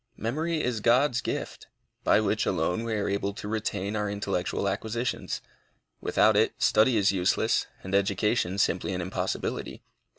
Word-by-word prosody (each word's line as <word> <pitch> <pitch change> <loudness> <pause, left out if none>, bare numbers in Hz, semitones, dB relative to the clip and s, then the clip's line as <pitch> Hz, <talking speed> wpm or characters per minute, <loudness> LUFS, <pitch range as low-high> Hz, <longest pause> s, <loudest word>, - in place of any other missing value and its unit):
Memory 155 +7 -1
is 125 -3 -1
God's 125 +3 +3
gift, - - -4 0.4
by - - +4
which 110 0 0
alone 90 +4 0
we 115 -1 -2
are 105 - -1
able 100 0 -1
to 105 - -6
retain 105 -1 -2
our 105 -1 -1
intellectual 100 -1 -2
acquisitions. 110 +5 -2 0.6
Without - - +3
it, - - +3
study 110 +2 +4
is 100 -1 +4
useless, 90 -2 +1 0.2
and 95 - -6
education 100 0 +1
simply 100 -1 +1
an 90 - -2
impossibility. 90 +2 -3
105 Hz, 145 wpm, -27 LUFS, 100-115 Hz, 0.6 s, by